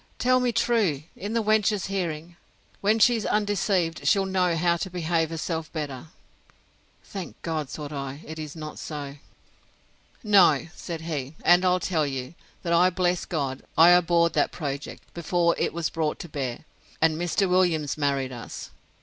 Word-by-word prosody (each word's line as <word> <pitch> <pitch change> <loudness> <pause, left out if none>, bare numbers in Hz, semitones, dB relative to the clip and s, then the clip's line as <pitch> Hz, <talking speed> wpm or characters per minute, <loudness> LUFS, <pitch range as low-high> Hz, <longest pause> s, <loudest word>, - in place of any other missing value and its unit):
Tell 255 +1 +3
me 250 -1 +1
truly, 200 - +1
in 205 +3 -5
the 230 -1 +1
wench's 210 -2 +2
hearing. 175 -3 -3 0.4
When 210 +2 +2
she's 225 0 +4
undeceived, 195 -5 0
she'll 195 -2 +4
know 185 -2 +1
how 170 +1 +2
to 190 - -4
behave 165 -2 0
herself 165 0 -4
better! 145 -3 -5 1.0
Thank 195 -3 -8
God, 155 -4 -2
thought 150 -1 -6
I, 140 +1 -5
it 160 +1 -7
is 155 -1 -6
not 155 -1 -7
so. 145 -2 -6 1.1
No, 190 - +5
said 165 -3 -6
he; 150 -3 -4
and 175 +1 +6
I'll 180 0 +3
tell 165 -4 0
you, 130 0 -5 0.3
that 170 - 0
I 180 +2 +5
bless 180 -1 0
God, 140 -5 -3 0.2
I 165 +2 +8
abhorred 170 -1 +4
that - - +2
project, 140 -3 -5
before 170 0 +1
it - - +1
was 170 -1 -2
brought 155 -2 -1
to - - -7
bear: 135 -1 -4 0.3
and 160 0 +3
Mr. 175 +4 0
Williams 175 -6 +2
married 140 -3 0
us. 120 -2 -8
170 Hz, 160 wpm, -26 LUFS, 150-185 Hz, 1.1 s, I